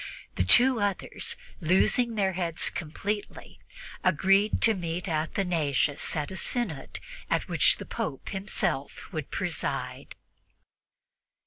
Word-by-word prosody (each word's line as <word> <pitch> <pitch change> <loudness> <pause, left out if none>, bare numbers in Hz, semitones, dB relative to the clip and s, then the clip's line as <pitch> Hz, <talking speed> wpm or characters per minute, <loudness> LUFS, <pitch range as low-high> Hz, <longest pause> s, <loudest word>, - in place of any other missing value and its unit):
The 90 - +1
two 245 - +5
others, 205 -1 -1 0.2
losing 205 +7 +3
their 195 -2 +1
heads 170 -2 +2
completely, 200 +6 -5 0.4
agreed 195 +4 +3
to 225 - +5
meet 175 -1 -4
Athanasius 155 -4 0
at 150 +1 -2
a 190 - -6
synod 195 - -3 0.3
at - - 0
which - - +4
the - - -8
Pope 135 - -4
himself 195 +1 -2
should - - -4
preside. - - -4
185 Hz, 110 wpm, -28 LUFS, 160-205 Hz, 0.4 s, two